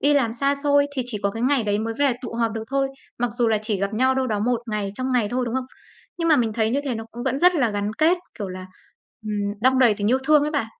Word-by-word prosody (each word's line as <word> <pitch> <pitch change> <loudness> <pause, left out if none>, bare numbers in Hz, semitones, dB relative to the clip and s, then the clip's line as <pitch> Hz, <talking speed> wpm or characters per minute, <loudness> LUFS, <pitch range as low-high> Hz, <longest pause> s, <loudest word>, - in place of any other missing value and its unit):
đi 290 +1 +3
làm 235 -5 +2
xa 275 +4 +1
xôi 285 -1 +4
thì 255 - +1
chỉ 225 -4 -3
có 200 - +1
cái 225 +3 -5
ngày 265 -1 +2
đấy 205 0 0
mới 225 +1 -3
về 285 -2 +3
tụ 235 -2 -6
họp 230 -1 0
được 225 0 -5
thôi, 275 0 +1 0.3
mặc 245 0 0
dù 240 -1 +1
là 220 -1 +2
chỉ 215 -3 -1
gặp 200 +2 -1
nhau 260 +3 +2
đâu 265 0 0
đó 215 -4 -1
1 240 +2 0
ngày, 210 -2 -2
trong 255 +3 -2
ngày 235 -5 +2
thôi, 250 +2 -1
đúng 235 - -3
không? 260 -1 -2 0.5
Nhưng 335 -1 0
mà 310 - +6
mình 230 -4 +1
thấy 220 0 0
như 275 - +1
thế 265 -4 -1
nó 225 0 -5
cũng 240 - -7
vẫn 265 +1 0
rất 360 +2 +5
là 250 -9 +2
gắn 205 0 -2
kết, 330 +4 +4 0.2
kiểu 200 - -4
là, 185 0 -7 0.6
ừm, 215 - -2 0.3
đong 260 +2 +3
đầy 240 -5 +5
tình 205 +2 -1
yêu 260 - +3
thương 300 0 +5
ấy 300 - -1
bạn. 285 -7 -1
245 Hz, 300 wpm, -23 LUFS, 220-275 Hz, 0.6 s, mà